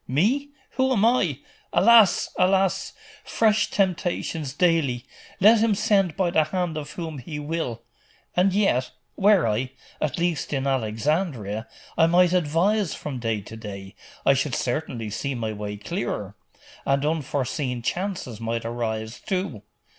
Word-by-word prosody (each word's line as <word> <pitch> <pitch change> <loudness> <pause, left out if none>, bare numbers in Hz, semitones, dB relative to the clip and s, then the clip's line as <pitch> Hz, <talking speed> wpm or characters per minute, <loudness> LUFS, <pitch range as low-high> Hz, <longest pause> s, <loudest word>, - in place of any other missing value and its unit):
'Me? 230 - +1 0.3
Who 260 0 +2
am 220 -3 +3
I? 180 - +2 0.3
Alas! 225 -1 +5
alas! 190 0 +2 0.3
fresh 220 -1 +2
temptations 175 -6 -1
daily! 145 -6 +1 0.3
Let 215 +4 +7
him 220 -1 +3
send 195 -5 +2
by 185 -3 +1
the 155 -2 +3
hand 175 0 -2
of 150 -2 -6
whom 160 -5 -5
he 150 +5 -7
will.... 145 -6 -3 0.5
And 185 +2 +4
yet 190 -11 +2 0.3
were 200 - +4
I 120 +5 -1 0.3
at 155 +2 -1
least 170 -4 -1
in 135 -1 -1
Alexandria 120 - -1 0.3
I 165 - +6
might 175 +1 +4
advise 180 +4 +1
from 140 -4 -5
day 115 -3 -1
to 105 +3 -10
day.... 100 -3 -8 0.3
I - - +6
should 135 0 -1
certainly 120 -4 -3
see 140 +6 -3
my 110 -2 -3
way 105 0 -5
clearer.... 105 - -4 0.5
And 140 +1 +1
unforeseen 140 -4 -2
chances 175 - -3
might 115 0 -2
arise, 110 -1 -3
too 185 - -3
155 Hz, 140 wpm, -24 LUFS, 120-185 Hz, 0.5 s, Let